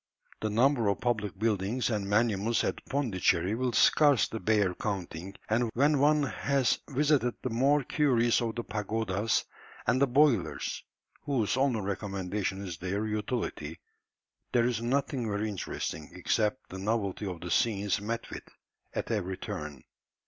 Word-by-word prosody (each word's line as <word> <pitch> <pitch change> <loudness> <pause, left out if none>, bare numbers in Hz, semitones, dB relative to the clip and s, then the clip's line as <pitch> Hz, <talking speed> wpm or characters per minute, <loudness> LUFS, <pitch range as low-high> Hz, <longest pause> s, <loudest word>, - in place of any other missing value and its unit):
The 110 - -1
number 120 +1 +3
of 100 -2 +1
public 105 -6 -1
buildings 110 +3 0
and 100 -2 -2
monuments 110 +1 +2
at - - -2
Pondicherry 95 -8 +1
will 125 +2 0
scarcely 135 -3 +4
bear 105 -2 +2
counting, 95 -1 -4
and 115 +2 +1
when 145 +3 +3
one 150 +1 +4
has 135 -1 +1
visited 140 -3 +2
the 130 - -2
more 140 +5 +3
curious 120 -5 +2
of 115 -2 -2
the 120 - -3
pagodas, 105 0 -1 0.4
and 130 - +2
the 140 - +5
"boilers," 130 - +2 0.4
whose 125 -7 0
only 130 -4 +1
recommendation 100 0 -3
is 85 -4 -6
their 100 +4 -2
utility, 110 +3 -3 0.7
there 120 -1 +4
is 120 -2 0
nothing 125 -1 0
very 105 +1 -1
interesting, 90 -6 -4
except 105 +7 -1
the 95 - -6
novelty 100 -1 -1
of 90 -3 -5
the 90 - -5
scenes 105 -3 +1
met 115 +2 -3
with - - -8 0.5
at - - -2
every 95 -4 -1
turn. 75 -3 -6
110 Hz, 145 wpm, -29 LUFS, 100-125 Hz, 0.7 s, the